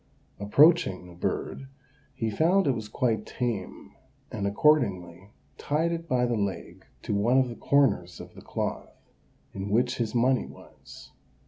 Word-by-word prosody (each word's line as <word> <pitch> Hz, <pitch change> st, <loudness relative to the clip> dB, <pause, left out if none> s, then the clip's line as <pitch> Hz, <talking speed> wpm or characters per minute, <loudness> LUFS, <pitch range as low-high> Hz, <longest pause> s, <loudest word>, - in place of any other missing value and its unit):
Approaching 105 Hz, -, +3 dB
the 90 Hz, -, -13 dB
bird, 110 Hz, +9 st, -4 dB, 0.5 s
he 115 Hz, -4 st, -2 dB
found 175 Hz, -, +2 dB
it 140 Hz, -, +3 dB
was 110 Hz, -4 st, -5 dB
quite 115 Hz, -3 st, 0 dB
tame, 115 Hz, -7 st, -4 dB, 0.4 s
and 100 Hz, -, -2 dB
accordingly 100 Hz, -, +1 dB, 0.3 s
tied 160 Hz, +3 st, 0 dB
it 165 Hz, 0 st, -4 dB
by 125 Hz, -2 st, +2 dB
the 120 Hz, -1 st, 0 dB
leg 100 Hz, -4 st, -4 dB, 0.2 s
to -, -, -3 dB
one 110 Hz, +6 st, +2 dB
of 130 Hz, -2 st, +3 dB
the 120 Hz, -, -7 dB
corners 125 Hz, -13 st, +1 dB
of -, -, -11 dB
the -, -, -13 dB
cloth, -, -, -5 dB, 0.6 s
in 100 Hz, +1 st, -5 dB
which 120 Hz, +4 st, +1 dB
his 115 Hz, 0 st, -2 dB
money 125 Hz, +2 st, +2 dB
was. -, -, -15 dB
120 Hz, 150 wpm, -27 LUFS, 100-135 Hz, 0.6 s, Approaching